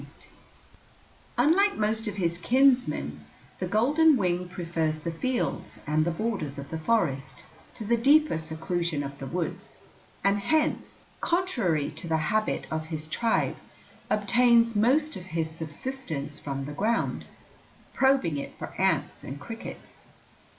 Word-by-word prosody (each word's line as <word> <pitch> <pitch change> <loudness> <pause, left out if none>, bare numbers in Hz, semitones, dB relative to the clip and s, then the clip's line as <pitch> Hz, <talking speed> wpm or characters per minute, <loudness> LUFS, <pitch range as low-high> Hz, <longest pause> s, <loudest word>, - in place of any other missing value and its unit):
[Illustration: - - -16 1.1
FLICKER] 245 +4 +4
Unlike 395 +6 +4
most 220 +1 0
of 205 - -3
his 170 -4 0
kinsmen, 240 - +2 0.4
the 185 - -2
golden 290 - +4
wing 180 -3 0
prefers 165 -3 -2
the 170 - -2
fields 250 +9 -2
and 155 +1 +2
the 170 - 0
borders 170 -6 -2
of 140 0 -8
the 160 - -3
forest 140 - 0 0.3
to 220 - -7
the 235 +3 +3
deeper 285 - +4
seclusion 160 0 -2
of 140 0 -7
the 135 - -5
woods, 180 +5 -4 0.5
and 200 +1 +3
hence, 310 +9 0
contrary 230 - 0
to 160 +3 -6
the 160 -1 +2 0.2
habit 215 0 0
of 155 0 -2
his 155 -2 -5
tribe, 225 +9 0 0.5
obtains 230 +2 +4
most 275 +9 +3
of 180 - -7
his 160 -1 -1
subsistence 160 - -6
from 135 -1 -4
the 145 - -6
ground, 220 +8 0 0.7
probing 265 - +3
it 140 - -6
for - - -7
ants - - +1
and 135 +2 -7
crickets. 225 +9 -9
180 Hz, 145 wpm, -27 LUFS, 155-235 Hz, 1.1 s, FLICKER